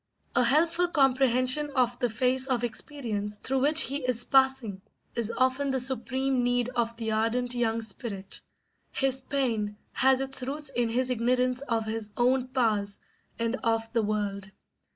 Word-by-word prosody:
A - - +4
helpful 330 +7 +3
comprehension 270 -1 +2
of 245 -2 +1
the 245 -2 +1
phase 255 +4 +1
of 250 -3 0
experience 220 -4 -4
through 265 +5 -1
which 300 +4 +5
he 275 - 0
is 250 -4 -2
passing 265 -7 +2 0.3
is 235 -2 0
often 260 +2 +1
the 265 -1 0
supreme 260 +1 0
need 245 0 +1
of 235 -2 -2
the 225 -1 -3
ardent 230 +3 0
young 230 -2 0
spirit. 200 -2 -7 0.5
His 265 -1 -1
pain 230 -7 -2 0.2
has 265 0 +3
its 270 -1 0
roots 285 +3 -4
in 240 -3 0
his 255 +2 0
ignorance 250 +2 +1
of 230 -5 -1
his 220 -1 -4
own 255 +1 +2
powers 215 -6 0 0.4
and 230 +2 -1
of 225 -2 -1
the 230 - +2
world. 205 -2 -2
250 Hz, 155 wpm, -27 LUFS, 225-265 Hz, 0.5 s, which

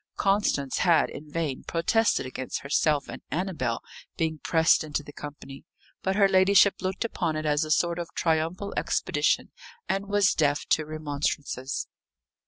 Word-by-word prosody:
Constance 195 -9 +1
had 170 -3 +3
in 150 +1 -9
vain 150 -4 -3
protested 190 +1 +1
against 130 0 -5
herself 145 +1 +1
and - - -8
Annabel 155 -9 -2 0.3
being 160 -2 -1
pressed 160 +1 +3
into 150 -1 -3
the 145 - -12
company; 145 -2 -9 0.4
but 190 0 0
her 200 -1 +5
ladyship 195 +1 +4
looked 190 +4 -2
upon 170 -8 -2
it 155 0 -3
as 150 +1 +2
a 155 - -5
sort 170 +2 +2
of 170 - -5
triumphal 165 +5 0
expedition, - - 0 0.4
and 195 +1 -1
was 205 -1 +3
deaf 145 -2 +1
to 155 - +2
remonstrances. 145 -3 -3
160 Hz, 150 wpm, -27 LUFS, 145-190 Hz, 0.4 s, her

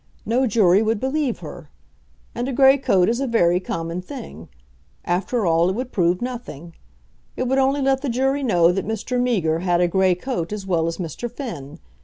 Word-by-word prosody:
No 250 +4 +1
jury 205 -3 +4
would 220 -1 0
believe 265 -1 -1
her. - - -10 0.6
And 245 +2 -3
a - - -3
grey 270 +2 +5
coat 195 -9 +2
is 235 +2 0
a 275 - -1
very 180 -7 +3
common 170 -1 -4
thing. 265 +8 -10 0.6
After 195 +6 -1
all, 165 +1 +3
it 190 - -2
would 255 +2 -4
prove 180 +2 +1
nothing. 230 - -7 0.6
It 255 - -1
would 265 +2 +2
only 270 +1 +2
let 270 0 +2
the 280 - -2
jury 270 +4 0
know 175 -9 +3
that 190 +1 -2
Mr. 225 +3 -2
Meager 180 -11 +1
had 175 -1 +1
a 175 - +3
grey 185 0 +2
coat 180 -4 -4
as 210 -2 -5
well 170 -4 0
as 165 - -3
Mr. 180 +7 -5
Finn. 175 - -7
215 Hz, 195 wpm, -22 LUFS, 175-255 Hz, 0.6 s, grey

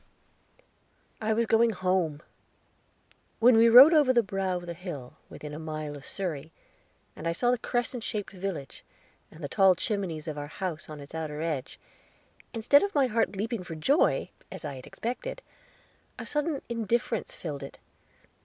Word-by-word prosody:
I 220 0 0
was 230 +2 +2
going 225 +1 +4
home! 180 -6 0 1.1
When 240 +1 +6
we 230 +1 +7
rode 260 +8 +10
over 295 -5 +5
the 240 -2 +4
brow 190 -2 -1
of 175 - -8
the 170 - -5
hill 165 -8 -7 0.2
within 150 -1 -8
a 150 - -6
mile 155 -2 -5
of 140 - -11
Surrey, 160 -5 -4 0.6
and 165 - -5
I 165 - +1
saw 245 +8 +2
the 250 - +1
crescent 240 0 -2
shaped 210 -3 -4
village, 185 -8 -5 0.5
and 160 - -13
the - - -2
tall 190 +4 +5
chimneys 175 -5 -3
of 150 -2 -4
our 145 - -5
house 165 -1 -5
on 150 -1 -8
its 140 - -12
outer 155 -1 -4
edge, 150 -6 -3 0.7
instead 240 +5 +4
of 400 -3 -2
my 280 -2 +5
heart 225 -3 0
leaping 220 +2 -2
for 165 -2 -7
joy, 275 - +2 0.2
as - - -7
I 145 - -4
had 130 -1 -10
expected, - - -5 0.7
a - - -6
sudden 295 -1 -1
indifference 230 -1 -1
filled 150 -5 -6
it. 140 - -9
190 Hz, 170 wpm, -28 LUFS, 155-235 Hz, 1.1 s, rode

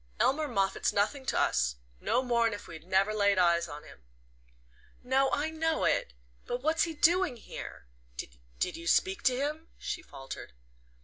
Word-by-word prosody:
Elmer 300 +3 +2
Moffatt's 195 -7 +1
nothing 260 +7 0
to - - +1
us 60 0 +2 0.2
no 255 - +1
more'n 235 -3 +2
if 205 - -7
we 165 - -8
never 190 +5 +2
laid 200 -2 +3
eyes 170 -1 +4
on 150 -1 -8
him." - - -14 1.0
"No 265 +2 +3
I 305 +2 0
know 320 0 0
it; 60 - +1 0.3
but 245 +1 -3
what's 320 +3 +3
he 330 -2 -5
doing 340 -3 +3
here? 220 - -9 0.3
Did - - -5
you 170 0 -7
speak 380 - +3
to 250 -1 +3
him?" 305 +4 -2
she 360 - -4
faltered. 135 - -9
235 Hz, 165 wpm, -30 LUFS, -, 1.0 s, eyes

